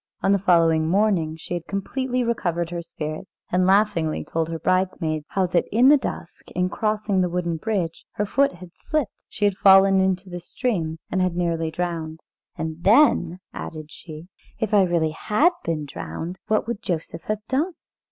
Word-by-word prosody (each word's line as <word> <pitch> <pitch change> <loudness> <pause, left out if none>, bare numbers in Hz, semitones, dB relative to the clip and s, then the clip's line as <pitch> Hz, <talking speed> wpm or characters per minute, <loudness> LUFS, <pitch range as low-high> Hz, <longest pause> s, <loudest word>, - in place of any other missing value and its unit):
On 195 - +3
the 200 - +4
following 165 -4 +3
morning 175 -4 +1
she 160 - -7
had 170 -2 -4
completely 250 +6 -2
recovered 175 -8 -1
her 170 -1 -3
spirits, 155 +1 -6 0.2
and 180 +1 +2
laughingly 195 -5 +2
told 165 0 -2
her 165 - -3
bridesmaids 170 -4 0
how 190 -1 +1
that 180 -1 +1
in 245 +5 +5
the 295 - +8
dusk, - - -7
in 180 0 +1
crossing 210 -1 0
the 180 - +1
wooden 170 -1 -2
bridge, 180 -3 -2
her 210 - -1
foot 275 +7 +2
had 175 0 -12
slipped, 305 -8 -2 0.2
she 210 - -1
had 200 -2 +1
fallen 195 0 +7
into 190 0 0
the 175 -1 -6
stream, 175 -4 -2
and 185 - +1
had 185 -1 +1
been 175 - 0
nearly 165 -1 -1
drowned. 160 -1 -4 0.4
"And 160 0 -5
then," 195 - +4
added 155 -2 -7
she, 160 0 -10 0.3
"if 220 -1 -2
I 205 - +6
really 170 -3 +1
had 215 - +2
been 155 -3 -2
drowned, 140 - -6
what 215 - +1
would 235 -2 -3
Joseph 165 -5 -4
have 215 0 -3
done?" 305 +8 0
180 Hz, 180 wpm, -23 LUFS, 165-205 Hz, 0.4 s, the